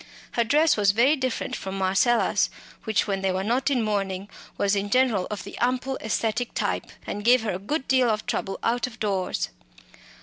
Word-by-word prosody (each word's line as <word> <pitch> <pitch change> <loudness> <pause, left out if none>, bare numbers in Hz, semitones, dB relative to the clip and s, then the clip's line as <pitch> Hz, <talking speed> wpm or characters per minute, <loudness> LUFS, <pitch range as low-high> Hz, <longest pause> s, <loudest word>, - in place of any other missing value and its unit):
Her 235 - +1
dress 300 +7 +4
was 200 -1 +4
very 255 +8 +4
different 260 -4 -2
from 195 0 -5
Marcella's, 195 +5 +2 0.4
which, 220 -3 +1
when 195 -2 -2
they 190 -1 +1
were 185 +1 -1
not 245 +6 +1
in 255 -5 +1
mourning, 200 -2 -2 0.3
was 200 0 +2
in 200 0 -1
general 240 -6 +2
of 210 - -5
the 200 - -9
ample 255 +2 0
"aesthetic" 225 +2 -1
type, - - -1 0.2
and 205 - -4
gave 245 +1 +5
her 220 - -1
a 180 - -3
good 265 +8 -3
deal 260 -2 +3
of 215 -1 -1
trouble 215 -5 -2
out 240 +2 +1
of 220 -3 -12
doors. 195 -3 -1
220 Hz, 195 wpm, -25 LUFS, 195-250 Hz, 0.4 s, gave